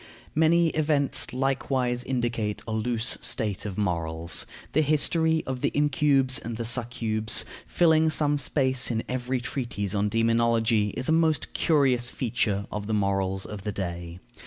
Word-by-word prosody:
Many 165 +2 +3
events 150 -5 +1
likewise 130 -1 -1
indicate 120 -4 -2
a - - -4
loose 110 +1 -1
state 105 -3 -1
of 95 - -6
morals. 85 -3 -2 0.3
The 155 - +3
history 160 +2 +2
of 130 -1 -4
the - - +1
incubes 140 -3 +3
and 115 -1 -6
succubes, 115 -2 0 0.2
filling 160 -2 +3
some 145 -2 +2
space 130 -1 +1
in 115 -2 -1
every 125 0 -2
treatise 115 -6 -3
on 105 0 0
demonology, 115 -1 +2
is 130 - -3
a - - +2
most 160 -1 +1
curious 130 -7 +2
feature 110 -6 -1
of 105 -1 -5
the 110 - 0
morals 95 -1 -1
of 105 -2 -7
the 105 +1 -4
day. 85 -3 -5
120 Hz, 145 wpm, -26 LUFS, 105-140 Hz, 0.3 s, Many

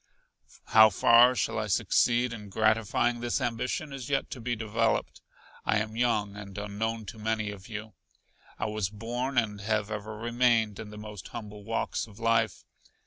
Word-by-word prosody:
How 110 -1 +8
far 115 +5 +6
I - - -1
shall 105 - -1
succeed 120 0 +2
in 105 -3 -8
gratifying 110 +3 +2
this 120 0 -1
ambition 125 +5 -2
is 130 -2 -6
yet 135 -1 0
to 125 - -6
be 120 +1 -1
developed. 115 +1 -1 0.4
I - - +2
am 110 +1 -2
young 110 -4 +1
and 100 -1 -9
unknown 110 +2 -3
to 110 - -9
many 110 -1 -1
of 100 +1 -11
you. 110 -1 -6 0.6
I - - -2
was 105 -3 -1
born, 120 +5 -4
and 105 -4 +1
have 105 0 -1
ever 105 0 -5
remained, 115 -2 +2
in 105 - -7
the 105 - -10
most 105 -3 -8
humble 105 -1 -8
walks 115 +1 -2
of 105 -2 -15
life. 115 -2 +1
110 Hz, 170 wpm, -29 LUFS, 105-120 Hz, 0.6 s, How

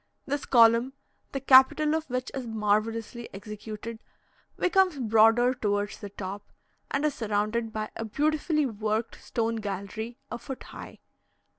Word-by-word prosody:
This 285 0 -2
column, 235 +1 +5 0.4
the 275 - -2
capital 270 +3 +6
of 320 -2 -2
which 255 +1 -3
is 260 -3 -5
marvellously 225 +2 -1
executed, 215 +2 -7 0.6
becomes 370 -3 +3
broader 225 +1 +4
towards 205 -4 -2
the 205 - -7
top, 195 0 -6 0.5
and 280 +2 0
is 300 - +1
surrounded 220 0 -1
by 215 0 -4
a - - -4
beautifully 300 +5 +1
worked 220 -1 -3
stone 230 -1 -1
gallery, 215 +3 -5
a - - -4
foot 265 +2 -7
high. - - -11
230 Hz, 135 wpm, -27 LUFS, 215-265 Hz, 0.6 s, capital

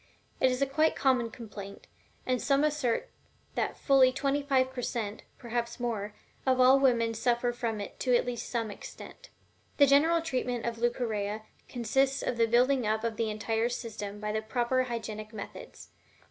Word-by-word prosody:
It 260 - +4
is 255 +2 +1
a - - +3
quite 310 +4 +2
common 255 -4 +2
complaint, 205 -4 -9 0.4
and 255 -1 0
some 280 0 +2
assert 295 -6 0 0.4
that - - -2
fully 270 -2 +5
twenty 275 +2 0
five 260 -2 +1
per 250 - -4
cent 225 -3 -3 0.2
(perhaps 235 0 -3
more) 215 -4 -3 0.3
of 260 -1 +2
all 260 +2 +7
women 235 -4 +3
suffer 240 +1 +1
from 230 -3 -3
it 205 - -7
to 250 -1 +2
at - - +2
least 245 -1 -4
some 230 -3 -2
extent. - - -11 0.5
The 285 - +7
general 320 +5 +4
treatment 250 -6 -2
of 230 -1 -3
Leucorrhea 220 -3 -1 0.3
consists 265 +3 +1
of 240 - -1
the 230 -1 +3
building 250 +1 +3
up 220 +1 0
of 230 -1 -1
the 225 0 -1
entire 225 +2 -1
system 210 -4 -5
by 210 0 -3
the 215 +1 -1
proper 245 +3 0
hygienic 220 -3 -5
methods. 205 -2 -9
240 Hz, 175 wpm, -29 LUFS, 220-260 Hz, 0.5 s, all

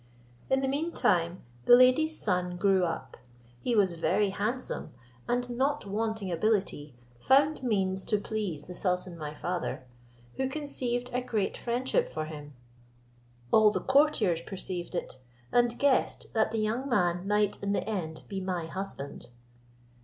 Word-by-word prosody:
In 265 0 +3
the 270 - 0
mean 295 +5 -1
time 175 - +1 0.2
the - - +9
lady's 255 +6 +4
son 180 -3 0
grew 190 -1 +3
up; 165 - -5 0.4
he 240 - 0
was 195 -4 +3
very 195 +5 +1
handsome, 225 +6 -3 0.4
and 245 0 0
not 275 +3 0
wanting 215 -1 -2
ability, 175 - 0 0.2
found 280 - +3
means 195 -6 +1
to 210 - +2
please 200 -8 -4
the 180 - -8
sultan 180 -1 -1
my 150 -2 -6
father, 175 -6 -3 0.5
who 265 0 0
conceived 250 -4 -3
a 250 - +1
great 215 -5 -1
friendship 260 - 0
for 155 - -3
him. 150 -2 -9 1.0
All 215 -1 +7
the 210 - -1
courtiers 265 - +3
perceived 185 -1 -5
it, 130 - -4 0.3
and 240 -1 +3
guessed 280 -2 +1
that 220 -1 +2
the 225 - -3
young 225 +6 -1
man 180 -5 +1
might 210 0 +1
in 200 0 0
the - - -1
end 170 -7 -3
be 195 -1 -4
my 180 -3 -2
husband. 165 -8 -6
205 Hz, 150 wpm, -29 LUFS, 180-245 Hz, 1.0 s, the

